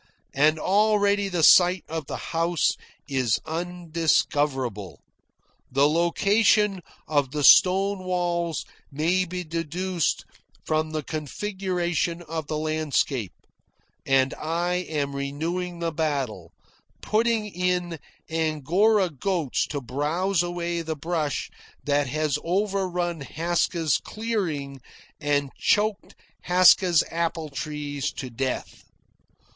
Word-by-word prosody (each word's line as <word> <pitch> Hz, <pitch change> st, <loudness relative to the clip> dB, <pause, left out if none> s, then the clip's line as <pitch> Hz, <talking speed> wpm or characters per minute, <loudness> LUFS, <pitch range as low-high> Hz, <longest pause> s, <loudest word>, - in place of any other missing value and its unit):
And 155 Hz, +3 st, +3 dB
already 205 Hz, +2 st, +2 dB
the 175 Hz, -3 st, -1 dB
site 180 Hz, +2 st, +6 dB
of 160 Hz, -3 st, -5 dB
the -, -, -4 dB, 0.2 s
house 165 Hz, 0 st, +2 dB, 0.4 s
is 130 Hz, -6 st, +1 dB
undiscoverable, 155 Hz, -, -1 dB, 0.7 s
the 135 Hz, +2 st, +4 dB
location 195 Hz, +4 st, +2 dB, 0.3 s
of 145 Hz, -3 st, +1 dB
the 145 Hz, +2 st, -3 dB
stone 195 Hz, +4 st, +6 dB
walls 175 Hz, -3 st, -1 dB, 0.3 s
may 170 Hz, +6 st, +1 dB
be 180 Hz, +1 st, -5 dB
deduced 170 Hz, +2 st, -2 dB, 0.4 s
from 155 Hz, 0 st, 0 dB
the 155 Hz, -1 st, -3 dB
configuration 175 Hz, +2 st, -2 dB
of 160 Hz, -2 st, -5 dB
the 155 Hz, -, -2 dB
landscape, 150 Hz, -, -1 dB, 0.7 s
and 135 Hz, 0 st, +2 dB
I 170 Hz, +3 st, -2 dB, 0.2 s
am 140 Hz, -3 st, -2 dB
renewing 165 Hz, +6 st, -3 dB
the 170 Hz, -1 st, -2 dB
battle, 135 Hz, -, -2 dB, 0.5 s
putting 225 Hz, 0 st, +1 dB
in 180 Hz, -3 st, -2 dB, 0.3 s
angora 165 Hz, +6 st, +2 dB
goats 160 Hz, -1 st, -1 dB
to 145 Hz, -1 st, -4 dB
browse 155 Hz, -, 0 dB
away 175 Hz, -1 st, -2 dB
the 160 Hz, -1 st, -4 dB
brush 155 Hz, -1 st, -2 dB, 0.3 s
that 145 Hz, -1 st, +1 dB
has 150 Hz, +1 st, -1 dB
overrun 180 Hz, -3 st, -1 dB
Haska's 165 Hz, +1 st, 0 dB
clearing 165 Hz, -, -3 dB, 0.4 s
and 145 Hz, -2 st, 0 dB
choked 210 Hz, 0 st, +1 dB, 0.3 s
Haska's 180 Hz, -1 st, +6 dB
apple 165 Hz, -1 st, -2 dB
trees 145 Hz, 0 st, -4 dB
to 130 Hz, -3 st, -6 dB
death. 130 Hz, +2 st, -4 dB
165 Hz, 105 wpm, -25 LUFS, 145-180 Hz, 0.7 s, site